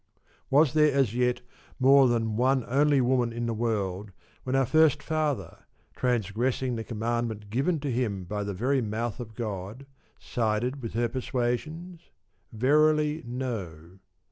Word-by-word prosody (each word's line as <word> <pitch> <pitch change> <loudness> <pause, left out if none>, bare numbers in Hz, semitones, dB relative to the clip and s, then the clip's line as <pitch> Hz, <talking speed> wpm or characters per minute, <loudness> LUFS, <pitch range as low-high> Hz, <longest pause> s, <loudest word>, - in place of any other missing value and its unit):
Was 145 0 +4
there 150 -1 +4
as 135 -5 +1
yet 125 0 +1 0.4
more 135 +1 +6
than 115 -2 0
one 130 +2 +2
only 140 +2 +3
woman 125 -1 +1
in 120 +1 -3
the 115 - -1
world, 105 -3 -2 0.4
when 130 +1 -1
our 135 0 +3
first 155 +1 +3
father 150 - -2 0.3
(transgressing 125 +2 -1
the 115 - -4
commandment 115 -2 -3
given 145 +8 0
to 140 -2 -2
him 110 -6 -1
by 105 +3 -4
the 100 -1 -4
very 130 +7 +1
mouth 115 +1 -3
of 110 -3 -8
God) 105 +2 -5 0.3
sided 120 +4 -2
with 115 - -6
her 120 +1 +1
persuasions? 135 +8 -3 0.4
Verily, 150 +5 +2
no. 95 -9 -5
120 Hz, 140 wpm, -27 LUFS, 110-135 Hz, 0.4 s, more